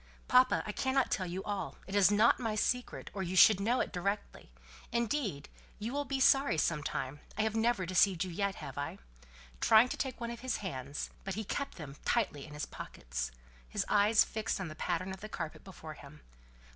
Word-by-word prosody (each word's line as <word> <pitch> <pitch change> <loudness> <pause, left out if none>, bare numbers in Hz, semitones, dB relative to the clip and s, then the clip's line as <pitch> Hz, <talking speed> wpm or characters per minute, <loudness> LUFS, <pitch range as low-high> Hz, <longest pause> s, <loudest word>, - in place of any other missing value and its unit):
"Papa, 255 0 +5
I 210 - -3
cannot 265 +4 +1
tell 185 -2 0
you 185 +2 -4
all. 205 -2 -4
It 195 - -8
is 200 -2 +6
not 210 +3 +4
my 225 -3 -1
secret, 250 +3 -1
or 195 - -3
you 185 0 -3
should 195 +2 +8
know 235 +5 +2
it - - -3
directly. 200 - -3 0.4
Indeed, 235 - -1 0.3
you 225 +4 -4
will 290 0 -1
be 275 0 -2
sorry 270 - +4
some 155 -1 +1
time 140 0 -4 0.2
I 215 - +2
have 220 0 -1
never 225 -4 +2
deceived 185 0 +3
you 185 - -5
yet, 200 +3 -1
have 140 +1 -7
I?" 145 - -4 0.6
trying 225 +3 +6
to - - -3
take 265 -2 -3
one 235 0 -3
of 235 - -7
his 260 0 -2
hands; 140 -7 -5
but 195 - -4
he 220 - -2
kept 280 +7 -4
them 145 -4 -8
tightly 175 -12 0
in 150 - -10
his 150 - -3
pockets, - - -5 0.4
his - - -1
eyes 210 +2 +5
fixed 220 -2 -2
on 185 -3 -4
the 155 - -8
pattern 180 +3 -2
of 190 - -10
the 215 - -7
carpet 165 -6 -5
before 160 -5 -9
him. 150 0 -13
200 Hz, 210 wpm, -32 LUFS, 165-230 Hz, 0.6 s, should